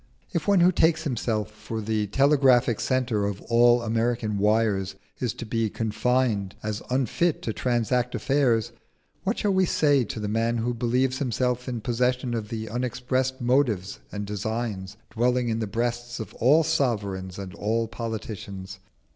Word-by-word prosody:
If 170 -4 -2
one 200 -3 +5
who 180 +1 +6
takes 160 -2 +2
himself 110 -6 -1
for 110 +1 -6
the 110 -1 -1
telegraphic 130 -2 +4
centre 120 -6 0
of 100 -1 -4
all 120 0 +5
American 115 -2 0
wires 105 -2 +1 0.2
is 125 -3 0
to 120 - -6
be 115 0 0
confined 110 -2 0
as 105 0 -3
unfit 135 +6 0
to 110 - -2
transact 125 +1 0
affairs, 130 -6 +1 0.5
what 200 +5 -1
shall 205 -2 +1
we 190 -1 +3
say 145 -5 +3
to 110 - -5
the 105 - -3
man 115 +2 0
who 120 +2 -1
believes 125 +2 0
himself 125 -1 -1
in 120 -3 -3
possession 125 +2 0
of 110 -3 -3
the 110 -2 -4
unexpressed 125 +3 -1
motives 120 -7 +1
and 105 0 -4
designs 105 -1 -4
dwelling 125 +1 +1
in 110 0 -1
the 110 - -2
breasts 120 +3 -2
of 110 -5 -6
all 150 +7 +4
sovereigns 100 - -1
and 95 -2 -7
all 115 +2 -1
politicians? 100 -5 -6
115 Hz, 155 wpm, -26 LUFS, 105-125 Hz, 0.5 s, who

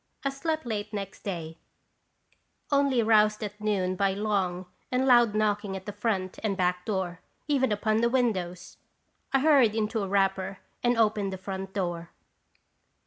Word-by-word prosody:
I - - +3
slept 315 +2 -2
late 210 -3 -3
next 195 -2 -5
day, 165 -4 -5 1.1
only 280 -4 +3
roused 215 -1 +4
at 210 0 -6
noon 190 -3 0
by 195 0 +1
long 195 -3 -1 0.3
and 255 +1 +1
loud 240 -4 +5
knocking 205 -2 0
at 190 -1 -7
the 205 - -4
front 200 -3 -2
and 205 -3 -1
back 180 -1 0
door, 185 -4 -2 0.3
even 265 -5 +2
upon 215 +1 +1
the 235 +1 +3
windows. 185 -8 -1 0.5
I 270 - +3
hurried 270 -8 +5
into 220 0 0
a 195 - -2
wrapper 195 0 0 0.2
and 240 -1 +2
opened 210 -3 +2
the 190 - -4
front 190 0 -6
door. 175 -3 -2
205 Hz, 155 wpm, -28 LUFS, 190-230 Hz, 1.1 s, loud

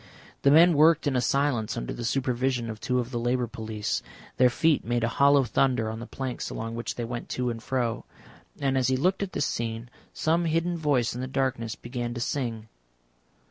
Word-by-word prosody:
The 140 - +4
men 165 +4 +7
worked 160 +2 +5
in 130 -3 +1
silence 125 -3 0
under - - -4
the 120 - -6
supervision 125 -1 0
of 110 - -9
two 125 +2 -1
of 125 0 -2
the 120 - -2
Labour 120 +1 0
Police; 110 -2 -3 0.4
their 125 -1 +6
feet 155 +4 +2
made 120 0 -1
a - - +3
hollow 140 +3 +4
thunder 120 -1 +1
on 110 - -6
the 120 - -7
planks 130 -2 -4
along 115 0 -5
which 115 0 -4
they 120 - -3
went 120 +1 -6
to 125 -1 0
and 115 -1 -6
fro. 120 -2 -2 0.5
And 135 -1 +1
as 125 - +1
he 130 0 +2
looked 185 +9 +1
at 195 -2 -3
this 145 - 0
scene, 115 +1 -3 0.2
some 165 +2 +1
hidden 165 +2 0
voice 145 -7 +1
in 125 - -5
the 130 - -3
darkness 130 -4 -1
began 120 -1 -5
to - - -4
sing. 115 -3 -3
125 Hz, 205 wpm, -27 LUFS, 115-140 Hz, 0.5 s, men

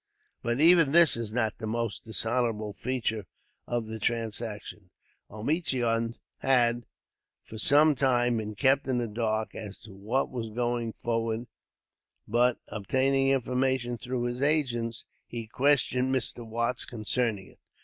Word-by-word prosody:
But 120 +2 -1
even 165 -2 +6
this 170 -1 +7
is 115 -2 -3
not 110 -2 -1
the 110 - -4
most 115 0 -3
dishonorable 110 -1 -1
feature 110 -3 -2 0.4
of 120 -2 -1
the 110 0 -6
transaction. 110 -3 -4 0.4
Omichund 115 - -1 0.2
had, 120 -3 +2 0.6
for 110 - -8
some 150 +6 +5
time, 125 -3 +2
been 110 -1 -4
kept 135 +4 +3
in 130 -2 +1
the 120 -1 -1
dark 110 0 -2
as 105 -2 -7
to 110 -2 -13
what 110 +8 -1
was 120 -3 -4
going 120 0 -2
forward; 115 0 -2 0.8
but, 120 +3 +3
obtaining 135 +6 +1
information 130 -1 +1
through 125 +1 -3
his 120 +1 -3
agents, 125 -6 0 0.2
he 115 -1 -6
questioned 130 +1 +2
Mr. 125 -2 0
Watts 120 +2 -1
concerning 110 -3 -2
it. - - -25
120 Hz, 135 wpm, -28 LUFS, 110-130 Hz, 0.8 s, this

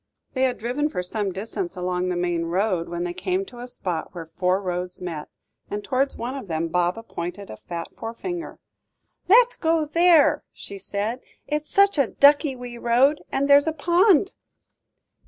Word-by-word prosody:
They 260 - -2
had 250 -2 -1
driven 250 +7 -1
for 180 -9 -3
some 200 +1 -2
distance 225 - -4
along 180 0 -1
the 180 - -1
main 175 -1 -1
road, 180 0 0
when 175 0 -3
they 175 0 -3
came 370 - -2
to 245 -9 -13
a 245 - -7
spot 180 -8 -4
where 170 -2 -6
four 180 +3 0
roads 180 -1 -3
met, 165 -4 -6 0.4
and 205 0 -4
towards 270 +1 0
one 245 +3 -4
of 270 -7 -7
them 165 0 -2
Baba 180 +6 0
pointed 180 0 -6
a - - -7
fat 170 +5 -7
forefinger. 330 +10 -6 0.7
"Let's 480 +5 +6
go 330 0 +2
along 300 - -4
there," 335 -3 +5
she 200 - -9
said; 205 +6 -3 0.2
"it's 300 0 -3
such 400 -5 +4
a 275 - +4
ducky 285 +1 +4
wee 245 -1 -8
road, 255 +6 +3
and 275 +1 0
there's 285 +1 +6
a 320 - +1
pond." 350 +4 +3
230 Hz, 180 wpm, -24 LUFS, 180-295 Hz, 0.7 s, Let's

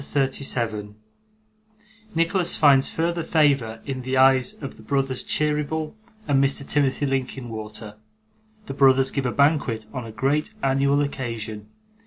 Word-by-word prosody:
CHAPTER 140 0 -3
37 115 -6 -2 1.2
Nicholas 170 +2 +1
finds 140 -3 +5
further 170 +1 -1
Favour 140 -9 +1
in 135 -2 -4
the 130 +1 -2
Eyes 130 -1 +4
of 135 -3 -8
the - - -14
brothers 135 +2 -1
Cheeryble 150 +1 -1 0.3
and 140 -2 +3
Mr. 140 0 0
Timothy 145 -1 +1
Linkinwater. 115 -5 -4 0.7
The 135 - -6
brothers 135 -1 +4
give 135 -3 -1
a - - -1
Banquet 140 -7 +1
on 125 -2 -5
a - - -8
great 140 - -1
Annual 140 +1 +2
Occasion. 115 -6 -4
135 Hz, 135 wpm, -23 LUFS, 120-145 Hz, 1.2 s, finds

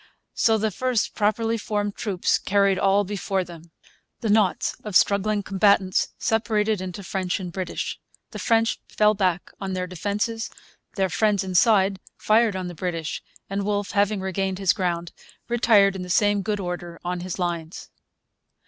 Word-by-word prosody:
So 225 -1 +3
the 215 0 0
first 250 +2 0
properly 225 +2 0
formed 205 -1 -2
troops 195 -5 0
carried 200 -1 +2
all 195 +1 +3
before 195 -1 -2
them. 170 -1 -12 0.5
The 220 - 0
knots 205 -4 +2
of 210 -3 -6
struggling 205 +1 +3
combatants 195 -1 +3
separated 215 -2 0
into 185 +1 -6
French 185 0 -2
and 180 -2 -6
British. 185 +1 -4 0.3
The - - -7
French 225 -1 +2
fell 210 0 +3
back 185 -4 -1
on 190 -1 -3
their 185 0 -2
defences. 205 +5 -2 0.5
Their 190 -2 +1
friends 205 +2 +1
inside 190 +1 +3 0.2
fired 220 -1 +3
on 185 -1 -3
the 175 - -6
British; 165 -2 -3 0.3
and 200 +1 -2
Wolfe, 205 0 -1
having 205 0 +1
regained 190 0 -2
his 195 0 +3
ground, 175 -3 -2 0.4
retired 220 -5 +4
in 190 - -5
the 180 - -7
same 205 +2 +3
good 210 0 -2
order 175 -2 -5
on 180 0 -2
his 180 0 -5
lines. 170 -2 -4
195 Hz, 155 wpm, -24 LUFS, 185-210 Hz, 0.5 s, retired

